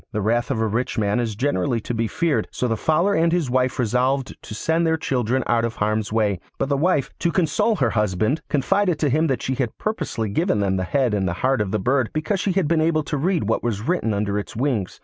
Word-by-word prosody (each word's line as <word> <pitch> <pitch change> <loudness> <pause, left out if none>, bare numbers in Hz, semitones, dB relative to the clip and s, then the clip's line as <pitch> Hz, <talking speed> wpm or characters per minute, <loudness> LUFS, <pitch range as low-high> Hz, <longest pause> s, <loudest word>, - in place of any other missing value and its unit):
The 105 - -1
wrath 120 +3 +1
of 130 -5 -1
a 110 - +1
rich 115 +4 -2
man 105 +1 +1
is 115 -3 -2
generally 115 -2 0
to 120 - -4
be 115 0 0
feared, 165 +4 0
so 125 - -2
the 115 - 0
Fowler 170 - +2
and 165 -2 +2
his 165 -7 0
wife 130 0 +1
resolved 130 +3 0
to 110 - -8
send 160 +8 0
their 160 0 +2
children 130 -3 0
out 115 -1 +2
of 115 0 -2
harm's 105 0 -1
way; 105 -4 +1 0.2
but 135 - -1
the 140 - +2
wife, 150 -1 +1
to 170 - +1
console 185 +6 +1
her 130 - +1
husband, 105 - 0
confided 180 +4 +1
to 150 -1 +1
him 155 +5 +2
that 130 -5 -1
she 130 - -1
had 130 -3 -2
purposely 160 - -2
given 160 - +1
them 100 -1 +1
the 95 -1 -1
head 130 0 +1
and 95 -3 0
heart 130 +8 0
of 105 - -1
the 110 - 0
bird 125 +1 +1
because 155 +6 -1
she 190 0 0
had 185 -4 +1
been 160 0 +2
able 155 -1 +2
to 150 - -3
read 175 - +1
what 110 +2 0
was 110 -4 -2
written 175 -10 +1
under 100 0 -1
its 100 - -8
wings. 115 -6 -1
125 Hz, 245 wpm, -22 LUFS, 110-155 Hz, 0.2 s, Fowler